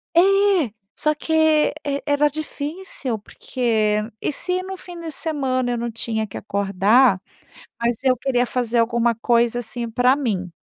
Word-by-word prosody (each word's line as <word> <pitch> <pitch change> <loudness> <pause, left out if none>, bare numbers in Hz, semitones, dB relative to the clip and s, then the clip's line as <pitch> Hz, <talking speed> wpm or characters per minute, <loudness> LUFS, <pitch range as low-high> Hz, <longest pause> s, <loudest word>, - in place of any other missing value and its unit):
É! - - +7 0.8
Só 305 0 +1
que 320 +2 -4 0.5
e 280 0 -2
era 290 0 +3
difícil. 295 - -4
Porque, 215 -1 -1 0.2
e - - -1
se 365 +4 -1
no 380 0 -6
fim 355 -2 -10
de 325 -2 -6
semana 265 -5 0
eu 240 - -1
não 235 0 -3
tinha 220 -1 -2
que 200 - -8
acordar, 200 +3 +3 0.6
mas 235 0 +1
eu 255 -1 +4
queria 250 0 0
fazer 240 -1 -1
alguma 235 0 +2
coisa, 235 +1 +2
assim, 235 0 -4
pra 245 +3 +3
mim. 210 -10 -2
245 Hz, 150 wpm, -21 LUFS, 230-285 Hz, 0.8 s, É